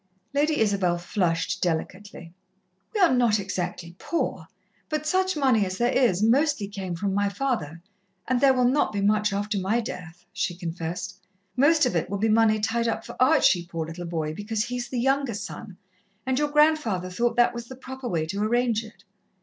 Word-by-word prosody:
Lady 295 +2 +1
Isabel 195 -5 +2
flushed 175 -2 -1
delicately. 175 +1 -4 0.6
"We - - 0
are 350 -7 +5
not 235 -4 +3
exactly 180 -3 -4
poor, 340 - -2 0.4
but 305 -1 -2
such 375 +2 +1
money 260 -7 +3
as 185 -1 -3
there 240 +1 +2
is 215 -8 +2
mostly 265 -1 +2
came 195 -3 -5
from 195 +3 -2
my 200 0 +1
father, 200 - -3 0.4
and 255 0 +1
there 275 -1 +6
will 250 -1 +3
not 270 0 +2
be 205 - -3
much 210 +1 +2
after 205 +1 -1
my 195 +5 +1
death," 175 -6 -7
she 175 - -2
confessed. 170 -1 -5 0.4
"Most 295 +3 +4
of 250 - -1
it 165 - -1
will 200 - -2
be 220 +3 +1
money 215 0 +4
tied 230 +2 0
up 225 - -2
for - - -9
Archie, 255 - +4
poor 165 -2 -4
little 170 +2 -7
boy, 160 -2 -2
because 210 +4 -2
he 250 +1 -4
is 245 -1 -4
the 255 - -4
younger 270 -2 +1
son, 200 -1 -8 0.5
and 260 +1 0
your 295 0 +1
grandfather 290 - +2
thought 235 +5 0
that 240 0 +4
was 235 0 -7
the 260 - -9
proper 260 0 -8
way 165 -3 -1
to 195 +6 -4
arrange 230 0 +1
it. 220 0 -15
215 Hz, 190 wpm, -25 LUFS, 185-255 Hz, 0.6 s, there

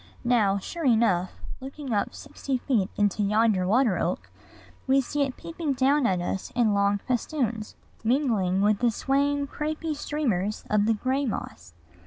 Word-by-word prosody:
Now, 215 -5 +3
sure 330 - -6
enough, 220 - +3 0.3
looking 270 -1 -6
up 205 - +1
full - - -14
sixty 280 -2 -4
feet 235 -7 0
into 205 0 +1
yonder 210 -2 +2
water 225 -1 +3
oak, - - -2 0.6
we 270 +1 +4
see 285 +2 -2
it 270 -2 -1
peeping 330 -4 -3
down 270 +1 +3
at 185 -2 +1
us 180 +2 -3
in 230 -3 +3
long 200 0 +2
festoons, 240 -3 -2 0.3
mingling 220 -7 +1
with 210 -1 +3
the 245 - +3
swaying, 280 +4 0
crapy 310 +2 -3
streamers 225 -10 -2
of 210 0 +3
the 225 - +3
gray 265 +5 -1
moss. 85 - -6
235 Hz, 160 wpm, -26 LUFS, 205-275 Hz, 0.6 s, we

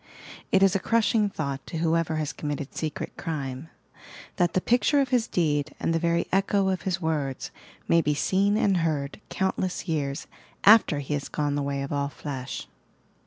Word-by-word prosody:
It 195 0 +5
ia 195 - +7
a 195 - +2
crushing 220 0 +2
thought 140 -7 -4
to 165 - -4
whoever 165 0 +1
baa 155 0 -1
committed 145 -2 -4
secret 155 -2 -4
crime, 140 -2 -4 0.3
— - - -16
that 175 -2 +2
the - - +3
picture 245 +8 +3
of 270 -2 +1
his 245 -2 +2
deed 150 -3 0
and 165 - 0
the 165 - +1
very 170 0 +1
echo 195 0 +2
of 185 -1 -1
his 185 0 -1
words 150 -6 -2 0.4
may 165 - +4
be 150 -1 0
seen 195 +7 +2
and 195 -3 +3
heard 155 -1 -1
countless 190 -1 -2
years 145 -2 -2 0.4
after 205 -7 +7
he 140 +2 -4
has 145 -1 -3
gone 145 -1 -1
the 145 - 0
way 140 0 -2
of 140 - -4
all 140 0 0
flesh 135 -3 -6
160 Hz, 185 wpm, -26 LUFS, 145-190 Hz, 0.4 s, ia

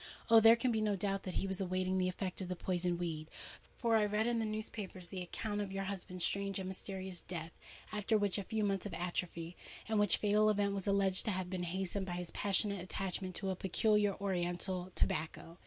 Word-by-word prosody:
Oh! 225 - +10
there 225 +1 +8
can 245 +1 +1
be 220 -1 +1
no 210 -1 +2
doubt 195 +1 -1
that 185 - -5
he - - 0
was 190 0 0
awaiting 185 0 0
the 185 - +2
effect 185 +1 -4
of 185 - -3
the 180 - -2
poisoned 175 -1 0
weed;—for 170 +7 -3
I 220 - +5
read 210 +1 +1
in 235 -1 +1
the 225 - 0
newspapers 215 -4 -5
the 180 +2 -5
account 205 +4 -3
of 200 -2 -4
your 195 0 -2
husband's 185 -2 -2
strange 200 -1 0
and 190 -1 -3
mysterious 190 -1 -4
death 170 -2 -6 0.4
after 210 +1 +1
a 205 -1 +2
few 210 +3 -1
months 195 -1 0
of 180 - -6
atrophy, 175 -1 -3 0.3
and 220 -1 +2
which 205 -3 +5
fatal 210 +1 +4
event 200 -1 +2
was 195 -1 -3
alleged 195 0 +3
to 215 - +1
have 185 -1 -3
been 185 -1 -2
hastened 190 +2 -2
by 175 - -3
his 175 -1 -4
passionate 200 -1 +1
attachment 185 0 -3
to 195 -1 -1
a - - -2
peculiar 205 +2 +2
oriental 180 -1 -1
tobacco. 165 +2 -1
190 Hz, 210 wpm, -35 LUFS, 180-205 Hz, 0.4 s, Oh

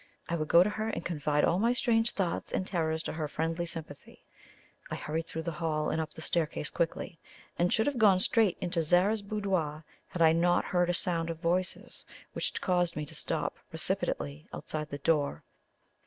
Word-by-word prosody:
I 170 - -1
would 155 -2 -2
go 170 +3 +7
to 200 - 0
her 220 +1 -2
and 170 - -4
confide 150 -3 +1
all 175 - +2
my 230 +3 +3
strange 230 -2 +2
thoughts 180 -4 -2
and 185 - -1
terrors 160 -3 -1
to - - -4
her 155 -2 -2
friendly 165 +3 -2
sympathy. 155 -4 -9 0.7
I - - -3
hurried 160 +2 -3
through 160 - -4
the 170 - -2
hall 155 -1 -1
and 160 - 0
up 155 - -5
the 160 - -8
staircase 160 -3 -1
quickly, 165 0 -2 0.4
and 175 +1 +3
should 220 - +3
have 285 -4 0
gone 200 -4 +6
straight 210 -1 +3
into 175 -2 0
Zara's 180 +7 +3
boudoir 190 -7 -2 0.2
had 170 - 0
I 160 - +7
not 175 +2 +3
heard 175 -1 +1
a 175 - +2
sound 170 -2 0
of 165 - -3
voices 180 +2 -2 0.3
which - - -2
caused 175 -2 +1
me 150 - -3
to - - -11
stop - - -2
precipitately 70 +1 -2
outside 150 -1 -5
the 145 - -4
door. 145 0 +1
170 Hz, 195 wpm, -30 LUFS, 160-185 Hz, 0.7 s, go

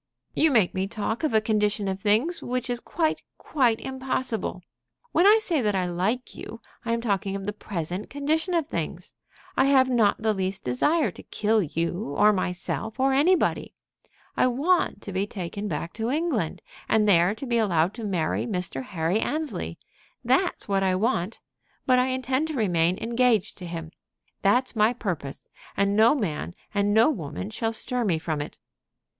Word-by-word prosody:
"You 320 - +4
make 220 -10 +3
me 190 0 -1
talk 220 +5 -3
of 310 - +1
a 220 - +4
condition 210 -1 0
of 190 0 -2
things 225 - +2
which 250 0 -2
is 240 - -1
quite, 315 +4 -1 0.2
quite 245 -6 +1
impossible. 255 -7 -3 0.5
When 355 - +4
I 425 +2 +8
say 340 -9 0
that 210 -3 +1
I 185 -1 +1
like 190 +8 -1
you, 230 - -9 0.2
I 230 - -2
am 230 0 0
talking 200 -3 -1
of 195 -1 -5
the 210 - -2
present 185 -2 -4
condition 315 +5 0
of 330 -3 +1
things. - - -5 0.4
I 265 - +4
have 265 -2 +4
not 225 -5 +3
the 220 0 +1
least 190 -1 -3
desire 295 - +1
to - - -11
kill 220 +1 +1
you, 170 -1 -2
or 210 0 +6
myself, 195 +5 -3
or 270 +1 +3
anybody. 330 +7 +2 0.6
I - - +3
want 280 - +1
to 200 - -5
be 195 +2 0
taken 200 +1 -5
back 170 -4 -4
to 225 +1 -2
England, 275 - -1 0.3
and 215 -1 +3
there 180 +1 +4
to 235 - -6
be 235 -2 +1
allowed 180 -4 +2
to 230 - -8
marry 185 -2 -1
Mr. 180 - -1
Henry 165 +6 -1
Annesley. 310 +5 -3 0.5
That's 370 -1 +1
what 195 -1 +1
I 190 -1 +2
want. 200 -1 -1 0.4
But 255 -1 +4
I 250 - +2
intend 260 +3 0
to 315 - -4
remain 180 -6 +2
engaged 230 -3 +1
to 180 - -7
him. 165 -1 -6 0.5
That's 245 +6 +2
my 220 +2 +4
purpose, 170 - -4 0.3
and 200 0 +2
no 225 +6 +5
man 175 - -3 0.2
and 205 0 +1
no 225 +8 +5
woman 170 - -5
shall 225 0 -1
stir 245 +2 0
me 180 -7 +1
from 155 -2 -3
it." 145 - -7
215 Hz, 180 wpm, -26 LUFS, 190-255 Hz, 0.6 s, I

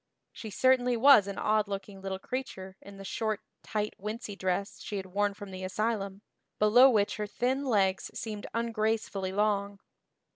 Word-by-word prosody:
She 220 - -8
certainly 250 +3 +3
was 235 -5 +7
an 200 - -5
odd 215 -1 +1
looking 195 0 -6
little 190 0 -3
creature 190 -4 -6
in 200 0 -12
the 195 - -9
short 215 +1 -2 0.2
tight 210 -1 -2
wincey 210 0 -5
dress 190 +1 -2
she 205 - -4
had 190 - -4
worn 200 +2 0
from 205 -1 -9
the 185 0 -7
asylum, 200 0 -2 0.3
below 245 +5 +7
which 210 -5 +1
her 210 -1 -3
thin 260 +6 -1
legs 195 -6 +1
seemed 210 -2 -5
ungracefully 220 -4 -1
long. 200 0 0
205 Hz, 160 wpm, -30 LUFS, 195-225 Hz, 0.3 s, was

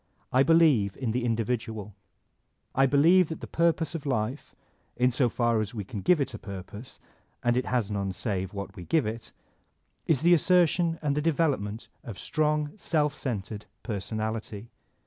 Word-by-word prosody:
I 130 - +5
believe 145 - +4
in 125 -4 -2
the 125 +2 -1
individual. 110 -2 -2 0.8
I 135 +1 +4
believe 165 +6 +5
that 160 - -5
the - - -7
purpose 165 -1 +1
of 155 -3 -5
life 125 +1 -2 0.4
(in 125 +1 +3
so 125 0 +2
far 115 -1 +1
as 110 +2 -5
we 105 - -3
can 100 +1 -6
give 180 - +4
it 135 -3 -1
a 110 - -7
purpose, 100 +4 -9 0.4
and 120 0 +2
it 125 - 0
has 120 -5 0
none 100 -1 -2
save 95 -1 -3
what 100 0 -7
we 90 - -8
give 160 - +2
it) 115 +2 -5 0.8
is 155 -2 +2
the 175 +1 +6
assertion 175 0 +3
and 145 -2 +1
the 150 - 0
development 145 -10 0 0.2
of 115 -5 -8
strong, 150 -1 0
self 150 -6 0
centered 105 -6 -5 0.2
personality. 110 0 -4
125 Hz, 165 wpm, -27 LUFS, 105-150 Hz, 0.8 s, the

